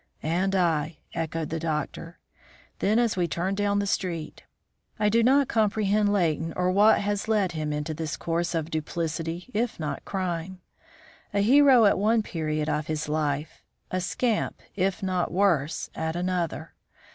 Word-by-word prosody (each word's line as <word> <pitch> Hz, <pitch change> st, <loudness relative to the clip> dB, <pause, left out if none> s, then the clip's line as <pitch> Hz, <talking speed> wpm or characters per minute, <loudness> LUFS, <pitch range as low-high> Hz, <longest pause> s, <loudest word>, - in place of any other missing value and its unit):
"And 185 Hz, +5 st, 0 dB
I," 160 Hz, -3 st, +1 dB, 0.2 s
echoed 160 Hz, -1 st, -3 dB
the 165 Hz, -, -2 dB
doctor; 160 Hz, +1 st, -4 dB, 0.6 s
then 215 Hz, +3 st, +2 dB
as 235 Hz, -2 st, +2 dB
we 175 Hz, -2 st, +1 dB
turned 180 Hz, +5 st, -2 dB
down 205 Hz, 0 st, +1 dB
the 205 Hz, -, +1 dB
street; 170 Hz, -5 st, -3 dB, 0.6 s
"I 210 Hz, -1 st, +2 dB
do 230 Hz, +2 st, +3 dB
not 270 Hz, +3 st, +4 dB
comprehend 210 Hz, -1 st, +2 dB
Leighton 165 Hz, -4 st, 0 dB
or 180 Hz, 0 st, +1 dB
what 205 Hz, +3 st, +5 dB
has 205 Hz, +1 st, -2 dB
led 210 Hz, -5 st, +2 dB
him 155 Hz, -2 st, -3 dB
into 150 Hz, +1 st, -3 dB
this 155 Hz, -1 st, -4 dB
course 170 Hz, +1 st, -1 dB
of 165 Hz, 0 st, -2 dB
duplicity 165 Hz, +4 st, -3 dB
if 230 Hz, -1 st, -1 dB
not 155 Hz, -1 st, -4 dB
crime. 185 Hz, -1 st, -3 dB, 0.8 s
A 200 Hz, -, +3 dB
hero 260 Hz, +1 st, +6 dB
at 200 Hz, -, +4 dB
one 220 Hz, +2 st, +3 dB
period 155 Hz, -4 st, -2 dB
of 150 Hz, 0 st, -1 dB
his 155 Hz, -1 st, -2 dB
life; 150 Hz, -1 st, -2 dB, 0.3 s
a 185 Hz, -, -1 dB
scamp, 225 Hz, +4 st, -1 dB
if 195 Hz, +1 st, 0 dB
not 185 Hz, -2 st, 0 dB
worse, 170 Hz, -6 st, +1 dB
at 160 Hz, 0 st, -3 dB
another! 180 Hz, -2 st, -2 dB
180 Hz, 155 wpm, -26 LUFS, 160-205 Hz, 0.8 s, hero